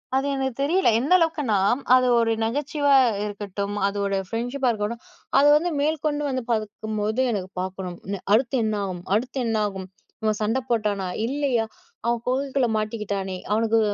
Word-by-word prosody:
அது 270 - +1
எனக்கு 265 -2 -2
தெரியல. 350 +4 +2
எந்த 275 +9 +2
அளவுக்குன்னா, 305 - +1 0.4
அது 255 0 +4
ஒரு 230 -1 +2
நகைச்சுவா 285 +4 +1 0.3
இருக்கட்டும். 205 -1 -4
அதோட 200 0 -1
ஃப்ரெண்ட்ஷிப்பா 245 +5 -1
இருக்கட்டும். 220 +2 -3 0.4
அத 280 - +6
வந்து, 345 +3 -1
மேல்கொண்டு 300 -1 0
வந்து 260 -2 -2
பாக்கும்போது, 215 +1 -1
எனக்கு 190 -3 -3
பாக்கணும். 185 -1 -5 0.4
அடுத்து 245 +4 +3
என்னாகும். 200 -5 -2
அடுத்து 255 +4 -1
என்னாகும். 210 -4 -1 0.4
இவன் 215 -1 +1
சண்டை 225 +5 +1
போட்டானா? 210 -5 0 0.2
இல்லையா? 265 -5 0 0.4
அவ 235 - +3
குகைக்குள்ள 265 0 +1
மாட்டிக்கிட்டானே, 200 -3 -3
அவனுக்கு 225 +1 +3
225 Hz, 135 wpm, -24 LUFS, 205-270 Hz, 0.4 s, அத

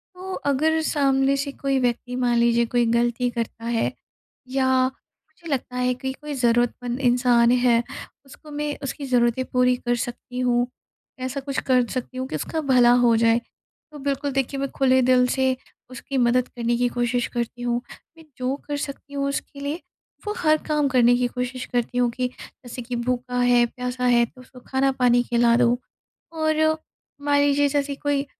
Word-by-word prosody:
तो 375 +1 -7
अगर 315 +3 +2
सामने 275 -3 +2
से 280 +1 -2
कोई 275 -1 -1
व्यक्ति 245 0 -1
मान 245 -1 +1
लीजिए, 235 0 +3
कोई 240 +1 +1
गलती 240 +1 +1
करता 230 -1 -5
है 235 -1 0 0.6
या 260 -1 +2
मुझे 300 +5 -15
लगता 250 -1 -4
है 250 0 +1
कि 265 0 -3
कोई 295 +2 -7
ज़रूरतमंद 245 0 0
इंसान 245 -1 +4
है, 245 -1 +3 0.4
उसको 300 +3 -14
मैं, 295 0 -3
उसकी 275 +1 -4
ज़रूरतें 245 0 +2
पूरी 250 0 +3
कर 240 -1 -1
सकती 245 +1 -5
हूँ, 245 -1 +2 0.5
ऐसा 255 +2 -3
कुछ 275 0 -3
कर 255 -2 +4
सकती 255 +1 -5
हूँ 260 0 -3
कि - - -5
उसका 320 - -3
भला 240 -1 +6 0.2
हो 230 - +5
जाए। 230 +1 +3 0.5
तो 300 - -10
बिल्कुल 280 +1 -2
देखिए 270 0 -1
मैं 275 0 -2
खुले 260 -1 +4
दिल 250 0 +4
से 260 0 +1 0.3
उसकी 260 +2 -5
मदद 250 0 +3
करने 240 -1 -1
की 245 0 +2
कोशिश 245 0 0
करती 240 0 -4
हूँ, 240 0 0 0.4
मैं 325 - -14
जो 255 +1 -1
कर 290 -1 -2
सकती 285 0 -7
हूँ 280 0 -1
उसके 280 0 -5
लिए, 290 +5 -4 0.5
वो 420 - 0
हर 310 -7 +3
काम 300 -2 +2
करने 245 -2 +4
की 245 0 +1
कोशिश 250 +1 -4
करती 245 0 -1
हूँ 245 -1 +3
कि 250 +1 -1
जैसे 250 -1 -10
कि 245 +1 -5
भूखा 250 +1 -2
है, 245 -1 +4
प्यासा 250 +1 -4
है, 240 -1 +4
तो 255 +2 -17
उसको 255 0 -15
खाना-पानी 260 -2 +2
खिला 235 -1 +3
दो 240 0 +3 0.5
और 315 -1 +1 0.4
मान 285 0 +2
लीजिए 285 0 +3
जैसे 285 0 -1
कोई 285 0 -1
250 Hz, 180 wpm, -23 LUFS, 245-275 Hz, 0.6 s, भला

